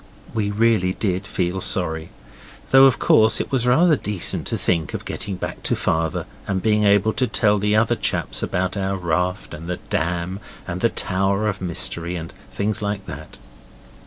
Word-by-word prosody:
We 105 -3 -1
really 105 -3 +2
did 95 -1 -2
feel 90 0 -2
sorry 80 -4 0 0.6
though, 135 0 +8
of 130 -5 +4
course, 110 +1 +4
it - - -4
was 125 -3 +1
rather 160 +6 +5
decent 105 -8 -1
to - - -1
think 80 -4 -1
of - - -6
getting 100 - -4
back - - -6
to - - 0
Father 80 0 -1 0.2
and 95 -2 0
being 105 +1 +2
able 100 +2 +3
to 130 - 0
tell 105 -3 +2
the 105 +1 +1
other 110 +1 +3
chaps - - -2
about 90 +2 -1
our 95 -1 -1
raft, 90 +2 -2
and 85 +2 -8
the 90 - -2
dam, 85 +3 -1 0.3
and 90 0 -4
the 115 - +3
Tower 100 +2 0
of 100 - -3
Mystery, 85 0 0
and 80 -1 -6 0.2
things 105 +2 -2
like 100 -1 -3
that. 75 +2 -9
95 Hz, 180 wpm, -22 LUFS, 90-105 Hz, 0.6 s, though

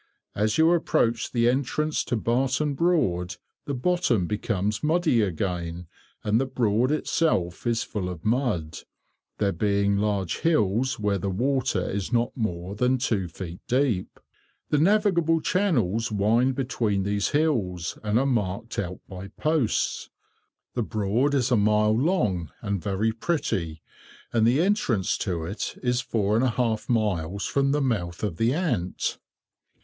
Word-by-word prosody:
As 105 +1 0
you 160 +1 +5
approach 120 -8 +1
the 120 -1 +2
entrance 140 +4 0
to - - -1
Barton 130 +6 0
Broad, 105 - +1 0.3
the 140 - -2
bottom 125 - +1
becomes 105 +1 -1
muddy 155 -6 +2
again, 90 -2 -2 0.4
and 110 +3 +2
the 135 - -1
Broad 120 0 +1
itself 125 - 0
is 115 -1 +1
full 95 -4 -4
of 90 -3 -8
mud; 110 - 0 0.6
there 100 -2 +1
being 100 +2 +1
large 100 -3 -1
"hills" 125 - +1
where 100 -2 0
the 100 - -2
water 125 -1 0
is 100 +2 -3
not 120 0 +1
more 90 -5 -3
than 125 +5 +2
two 110 -7 -1
feet 85 +1 -8
deep. 125 -7 0 0.5
The 150 - +3
navigable 175 -3 +3
channels 120 - +1
wind 115 +6 +2
between 115 -7 0
these 100 +1 0
hills, 110 - 0
and 105 +1 0
are 135 - +2
marked 115 -4 -1
out 90 -2 -4
by 95 0 -8
posts. 150 -1 -1 0.6
The 120 - -1
Broad 110 +6 0
is 130 -2 +1
a - - +5
mile 105 0 +3
long, 110 - +1
and 100 -4 -2
very 100 +5 0
pretty, 110 - -2 0.5
and 115 -1 +4
the 130 +6 +3
entrance 160 - +1
to 85 -5 -2
it 100 +6 -4
is 125 0 +1
four 110 -4 0
and 115 - +3
a 130 - +3
half 115 -2 -1
miles 100 -5 0
from 140 0 +1
the 145 +1 +1
mouth 95 -10 -2
of 95 -6 -2
the 115 +2 +2
Ant. 150 - -1
110 Hz, 150 wpm, -25 LUFS, 100-130 Hz, 0.6 s, you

